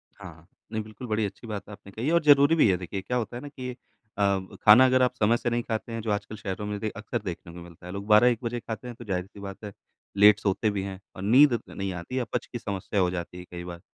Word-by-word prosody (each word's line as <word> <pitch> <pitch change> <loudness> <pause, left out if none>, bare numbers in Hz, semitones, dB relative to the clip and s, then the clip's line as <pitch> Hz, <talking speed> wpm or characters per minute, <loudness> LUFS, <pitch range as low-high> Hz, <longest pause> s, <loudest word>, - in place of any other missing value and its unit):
हाँ, 95 -4 -10
हाँ। 80 +2 -20 0.3
नहीं 110 - -1
बिल्कुल 110 0 -3
अच्छी 100 +4 -9
बात 105 -2 -6
आपने 100 -1 -12
कही 115 +6 -4
है 160 - +2
और 170 - +4
ज़रूरी 145 +1 +6
भी 150 - +5
है 90 - +3
देखिए, 95 +2 -5
क्या 125 - -2
होता 120 0 -3
है 125 - -6
ना 145 - -7
कि 130 -3 -6
अ, 110 -4 -16 0.2
ब 95 0 -10
खाना 110 +5 +9
अगर 130 0 +3
आप 125 -1 +2
समय 115 0 +3
से 120 - -2
नहीं 120 0 0
खाते 115 +1 -4
हैं 115 - -3
जो 110 - -3
आजकल 105 +1 -2
शहरों 100 0 -5
में 105 0 -3
दे 110 - -1
अक्सर 110 +3 -3
देखने 85 -2 -6
को 85 - -10
मिलता 85 0 -14
है। 90 - -7
लोग 100 +1 -6
12-1 115 +3 +5
बजे 120 0 -2
खाते 115 +2 -7
हैं, 120 - -7
तो 120 - -10
ज़ाहिर-सी 95 0 -4
बात 100 +1 -8
है, 105 - -6 0.4
लेट 105 0 +7
सोते 105 +2 +1
भी 100 -2 -2
हैं 95 -1 -6 0.2
और 95 - -7
नींद 130 +7 +6
त - - -23
नहीं 95 -1 -4
आती 85 +8 -7
है, - - +1
अपच 120 - -3
की 120 - -6
समस्या 100 -2 -2
हो 90 -1 +2
जाती 90 0 -5
है 90 - -8
कई 90 0 -7
बार। 85 -1 -8
105 Hz, 285 wpm, -27 LUFS, 95-120 Hz, 0.4 s, खाना